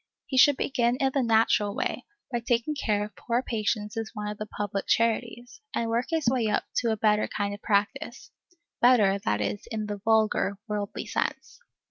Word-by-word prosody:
He 265 - -5
should 285 +1 +6
begin 240 -3 +1
in 265 +1 +1
the 275 - +2
natural 220 -3 +2
way, - - -3 0.2
by 240 - 0
taking 240 +4 0
care 210 -7 0
of 210 -2 -13
poor 240 +6 -1
patients 210 -2 -2
in 225 - -1
one 210 0 -4
of 210 - -6
the 215 - -4
public 200 -2 -4
charities, 235 - 0
and 230 -1 -1
work 235 +2 0
his 325 -2 0
way 240 -2 +2
up 210 - +1
to 235 - +2
a 220 - -1
better 210 0 +2
kind 205 0 -2
of 205 - -9
practice, 205 -1 -1 0.5
better, 215 -6 +5
that 105 - -1
is, 100 0 -3
in 215 -1 -2
the 205 -1 -4
vulgar, 215 -2 +2
worldly 205 -2 -3
sense. - - -3
220 Hz, 190 wpm, -27 LUFS, 205-240 Hz, 0.5 s, should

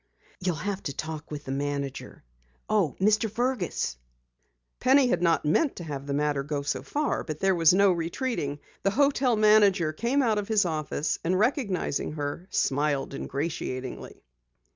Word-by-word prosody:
"You'll 180 -2 -1
have 200 +5 -3
to 140 - -2
talk 155 -1 -5
with 150 -1 -7
the 135 - -4
manager. 140 0 -4 0.4
Oh, 200 -10 +1
Mr. 215 +3 +3
Fergus!" 225 - -1 0.8
Penny 260 0 +4
had - - +1
not 165 -3 +2
meant 260 - +2
to 175 - -7
have 140 -3 -6
the 140 - -2
matter 145 -1 +1
go 145 0 -3
so 130 -2 -2
far, 290 - -1
but 155 -2 -6
there 195 0 +3
was 165 -2 +5
no 195 +1 +5
retreating. 170 - -2 0.2
The 195 - +2
hotel 270 +1 +2
manager 205 -6 +4
came 240 - +1
out 220 -4 +2
of 200 - -4
his 215 -3 +3
office, 155 -2 -2
and 180 +3 +1
recognizing 210 - 0
her, 145 +4 -4
smiled 140 0 0
ingratiatingly. 135 -3 -5
170 Hz, 160 wpm, -27 LUFS, 145-215 Hz, 0.8 s, was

